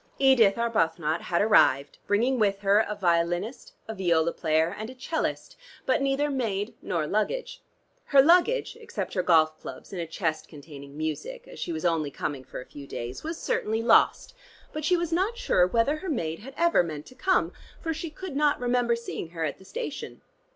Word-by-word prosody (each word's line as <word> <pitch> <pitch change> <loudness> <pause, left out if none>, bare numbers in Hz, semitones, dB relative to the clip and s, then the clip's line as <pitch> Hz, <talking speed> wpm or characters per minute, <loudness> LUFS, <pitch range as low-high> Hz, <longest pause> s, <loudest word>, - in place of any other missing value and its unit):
Edith 250 -7 +5
Arbuthnot 165 -8 0
had 175 +2 +1
arrived, 140 -10 +3
bringing 240 +5 +2
with 200 -2 +1
her 200 +1 +4
a 210 - -2
violinist, 175 +5 -1
a 220 - -4
viola 170 -4 +1
player 160 +3 +1
and 215 +2 -6
a 255 - -10
'cellist, 310 - -3 0.3
but 305 - +2
neither 275 +2 +1
maid 220 -5 -2
nor 170 -5 -1
luggage. - - -2 0.4
Her 280 - +4
luggage, 355 - +4
except 465 +2 -5
her 185 - +1
golf 160 -3 +3
clubs - - -10
and 180 - -3
a 165 - -4
chest 160 -1 -2
containing 140 -2 -12
music 465 - -4
(as - - -11
she - - -3
was 160 +1 -4
only 165 -4 +1
coming 140 -1 -4
for 130 - -8
a 125 - -9
few 140 -1 -11
days) 120 0 -6
was 325 +1 -4
certainly 220 +1 -1
lost, 235 - +4 0.4
but 310 - -4
she 355 +4 +3
was 340 -1 -2
not 390 +7 0
sure 180 - +3
whether 235 +9 +1
her 370 +4 -6
maid 165 - -2
had 270 +5 -11
ever 340 0 +4
meant 155 -4 -5
to - - -14
come, 375 +8 +1 0.3
for 325 -2 -2
she 320 +1 -5
could 315 0 -8
not 295 0 +2
remember 245 -1 +1
seeing 235 -7 -6
her 165 -1 -3
at 145 - -4
the 190 - -16
station. 485 - -6
210 Hz, 195 wpm, -27 LUFS, -, 0.4 s, Edith